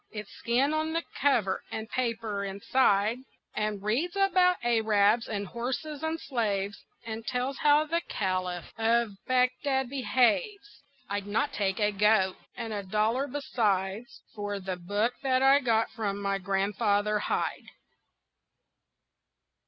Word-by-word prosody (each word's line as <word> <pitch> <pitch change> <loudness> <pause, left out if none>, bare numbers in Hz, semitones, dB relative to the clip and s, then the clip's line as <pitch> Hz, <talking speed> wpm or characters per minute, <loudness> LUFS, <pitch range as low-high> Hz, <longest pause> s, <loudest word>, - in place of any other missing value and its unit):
It's 210 -2 -8
skin 260 +5 +1
on 315 +1 -1
the 330 0 0 0.2
cover 235 -9 +2
and 220 0 -4
paper 225 -5 -2
inside, 200 +2 +2 0.3
And 210 -2 -2
reads 275 - 0
about 370 -2 +4
Arabs 220 -1 +3
and 205 -2 -2
horses 260 - -4
and 320 +1 -2
slaves, 205 -8 -1 0.3
And 225 0 -5
tells 255 +2 -2
how 295 +1 +4
the 335 +2 0
Caliph 185 -3 -2
of 230 0 +2 0.2
Bagdad 255 +1 +1
behaves. 395 - 0 0.3
I'd 200 0 -3
not 240 +7 0
take 195 -1 -1
a 210 0 +2
goat 200 -2 +3 0.2
and 225 -1 -4
a 205 - -2
dollar 215 +7 0
beside 215 -7 -1 0.3
For 205 -1 -4
the 190 -1 -4
book 205 +7 -1
that 260 -1 +2
I 270 +1 +6
got 230 -4 +1
from 205 -3 -3
my 200 -1 -1
Grandfather 205 +2 +1
Hyde. - - -2
225 Hz, 130 wpm, -28 LUFS, 200-265 Hz, 0.3 s, I